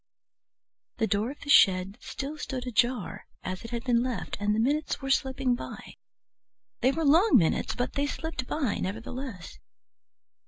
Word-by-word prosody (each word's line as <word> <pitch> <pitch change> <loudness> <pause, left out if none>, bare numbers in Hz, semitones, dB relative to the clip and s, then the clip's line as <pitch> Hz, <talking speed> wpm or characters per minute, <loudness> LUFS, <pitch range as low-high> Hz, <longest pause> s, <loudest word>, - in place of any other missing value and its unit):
The 225 - +2
door 215 +2 0
of 285 - -9
the 285 - -9
shed 190 +1 +5
still 280 +3 -5
stood 265 -4 -5
ajar 240 -2 0 0.2
as 185 0 -5
it 230 - -7
had 235 -1 -4
been 240 -2 +3
left, 250 -1 -3
and 205 +1 +1
the - - 0
minutes 290 +6 0
were 270 -1 -3
slipping 265 -2 +1
by. 230 -3 -7 0.9
They 255 - +3
were 320 +3 -1
long 335 +10 +5
minutes, 165 -7 +1
but 245 - -2
they 285 0 0
slipped 305 -4 -4
by 275 -9 -1
nevertheless. 225 - -6
250 Hz, 160 wpm, -28 LUFS, 220-275 Hz, 0.9 s, shed